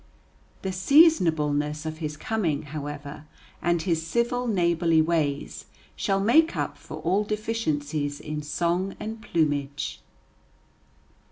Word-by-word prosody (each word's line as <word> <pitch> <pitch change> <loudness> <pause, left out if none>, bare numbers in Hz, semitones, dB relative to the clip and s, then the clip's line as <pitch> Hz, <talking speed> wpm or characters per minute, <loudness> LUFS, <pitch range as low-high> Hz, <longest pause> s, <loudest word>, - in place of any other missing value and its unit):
The 190 - -1
seasonableness 160 - +3
of 155 0 -5
his 150 -2 -4
coming, 165 -6 -1
however, 145 0 -7 0.4
and 175 -1 +1
his 165 -3 0
civil, 240 +7 0
neighborly 170 -5 +2
ways, 155 -3 0 0.3
shall 195 -2 0
make 285 +11 +4
up - - -2
for - - -9
all 190 +5 +2
deficiencies 155 -10 -2
in 150 0 -5
song 175 +5 -1
and 220 +1 -6
plumage. 145 -6 -1
165 Hz, 110 wpm, -26 LUFS, 150-205 Hz, 0.4 s, make